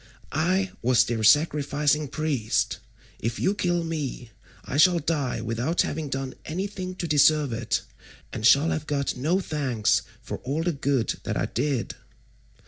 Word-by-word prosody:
I 185 +4 +1
was 125 0 +4
their 115 -2 -2
sacrificing 150 +2 +3
priest; 140 -6 -1 0.4
if 115 +1 -3
you 190 - +2
kill 175 -4 0
me, 145 -7 -4 0.3
I 135 - -3
shall 175 +3 +6
die 145 -7 -1
without 120 +9 0
having 150 -1 -4
done 135 -1 -3
anything 185 +2 -4
to 175 - -4
deserve 150 -2 +4
it, 115 0 -1 0.5
and 110 - -5
shall 140 +7 +5
have 155 0 -3
got 140 -1 -1
no 155 +9 +1
thanks 135 - 0 0.2
for - - -5
all 145 +6 -2
the 175 - +1
good 135 -4 0
that - - -3
I - - 0
did." 130 -1 -2
145 Hz, 150 wpm, -25 LUFS, 130-165 Hz, 0.5 s, shall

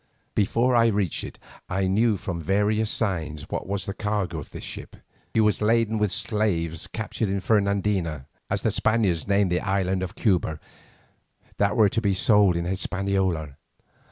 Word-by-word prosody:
Before 120 +5 +2
I 115 -1 +5
reached 100 -6 0
it - - -8 0.3
I 95 +1 0
knew 105 +3 +2
from 85 -2 -4
various 105 +5 +1
signs 80 -10 -2
what - - -3
was 100 0 -2
the 100 - -3
cargo 105 -6 -2
of 70 - -9
this - - -9
ship. - - -7 0.4
She 110 - +5
was 105 0 +2
laden 110 0 +2
with 105 -2 +1
slaves 85 -8 -1
captured 110 -1 -3
in 100 0 0
Fernandina, 100 -7 0 0.2
as - - -1
the - - +2
Spaniards 100 -8 +1
name 100 -1 +3
the 90 0 +1
island 95 -1 0
of 95 -1 -5
Cuba, 85 -7 +1 1.0
that - - +1
were 105 -2 +6
to 115 - -1
be 100 -3 +1
sold 100 -2 +4
in 85 0 -1
Hispaniola. 95 -5 -1
100 Hz, 165 wpm, -25 LUFS, 90-105 Hz, 1.0 s, were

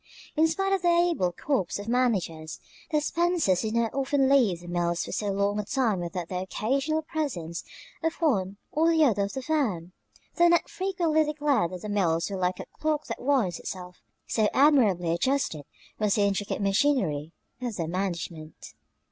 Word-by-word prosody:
In 320 +1 +4
spite 390 +4 0
of 385 - +1
their 345 -1 +4
able 335 - +2
corps 215 - -1
of 205 +1 -8
managers, 190 -11 0 0.3
the 305 -2 +1
Spencers 330 - +1
did 220 0 -2
not 235 -1 +1
often 275 0 +1
leave 235 -11 +3
the 175 - -12
mills 175 0 -1
for - - -7
so 210 - -2
long 200 +1 0
a - - -1
time 225 -4 0
without 175 0 -4
the 180 0 -3
occasional 275 +11 -1
presence 220 - -4 0.4
of 325 0 0
one 200 - 0
or 320 +2 +3
the 320 -2 +4
other 205 -6 +2
of 200 - -7
the 265 - -4
firm, 220 - -1 0.5
though 345 0 +6
Ned 340 0 +3
frequently 350 -5 +1
declared 295 - +1
that 180 -1 -8
the - - -4
mills 175 -3 +1
were 195 - -3
like 180 0 -1
a - - -5
clock 305 -1 0
that - - -5
winds 245 -11 +1
itself, 180 -1 -8 0.2
so 215 -2 +1
admirably 225 - +4
adjusted 170 - 0 0.3
was 210 -2 +2
the 205 - +2
intricate 200 0 -1
machinery 195 - +1 0.3
of 240 -4 -3
their 165 -4 -2
management. 170 -3 -5
215 Hz, 180 wpm, -27 LUFS, 180-295 Hz, 0.5 s, though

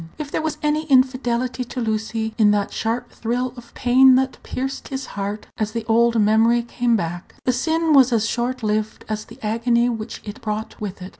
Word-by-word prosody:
If 300 -2 -6
there - - -1
was 315 -1 -2
any 300 +1 +1
infidelity 255 -2 +2
to 250 - -6
Lucy 220 0 -2
in 210 -1 +6
that 205 -1 +1
sharp 225 +2 -2
thrill 245 +2 -2
of 240 -1 -13
pain 255 +1 +6
that 260 0 0
pierced 265 +1 -4
his 265 -1 -4
heart 205 +1 -4
as 215 0 -1
the 230 -1 -3
old 235 +1 +3
memory 225 +3 +4
came 240 0 0
back, 175 -2 -4
the 255 - +2
sin 320 +5 +1
was 265 -3 +6
as 225 -2 +2
short 250 +1 -2
lived 215 0 -1
as 215 0 -3
the - - -14
agony 235 +2 +2
which 225 -1 -5
it 215 +5 -8
brought 215 +1 -4
with 200 -2 -5
it. 185 - -7
235 Hz, 200 wpm, -22 LUFS, 215-255 Hz, -, in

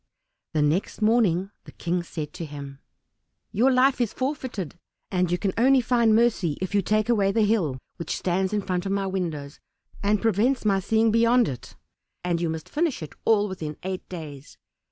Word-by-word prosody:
The 150 - +3
next 155 +7 0
morning 205 -4 +3
the - - -11
King 175 +1 -1
said 160 -3 -6
to - - -6
him, 140 -2 -8 0.7
"Your 250 +6 +3
life 255 0 +3
is 235 - 0
forfeited, 255 - -3 0.4
and 180 -2 +1
you 175 - +2
can 195 0 -1
only 265 +3 +5
find 235 -2 +3
mercy 220 -10 +2
if 185 +1 -4
you 205 - +3
take 215 +3 +1
away 205 -5 +3
the 220 +2 +2
hill 195 - +1 0.2
which 170 - -3
stands 185 +1 0
in 210 -1 -1
front 185 0 -2
of - - -2
my 200 -1 0
windows, 165 -7 -4 0.4
and 205 +1 +2
prevents 225 +4 +1
my 195 -2 +3
seeing 220 +3 +2
beyond 230 +1 +4
it; 125 -3 -7 0.5
and 175 -1 0
you 170 - 0
must 160 0 -5
finish 300 - -1
it 155 - -8
all 210 -2 +4
within 160 -6 -6
eight 185 0 -5
days. 150 -6 -9
195 Hz, 185 wpm, -25 LUFS, 170-225 Hz, 0.7 s, only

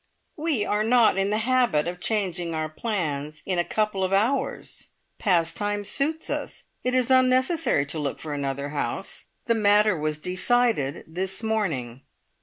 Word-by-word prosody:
"We 300 -9 0
are 210 +1 +1
not 225 -3 +4
in 195 +1 +1
the 210 - +1
habit 225 -9 +2
of 180 +1 -4
changing 180 -5 -1
our 155 0 -1
plans 155 -5 -3
in 185 -2 0
a - - +3
couple 210 0 -1
of 185 - 0
hours. 240 +8 0 0.3
Pastimes 205 +3 0
suits 310 +3 0
us. - - -4 0.2
It 250 0 0
is 255 0 +2
unnecessary 255 - +3
to 150 +3 -4
look 145 -2 -3
for 155 -2 -5
another 140 0 -3
house. 145 0 -3 0.2
The 235 - +3
matter 210 -1 +4
was 155 -1 -2
decided 185 - +1
this 190 +5 -4
morning." 155 - -1
195 Hz, 155 wpm, -25 LUFS, 155-230 Hz, 0.3 s, not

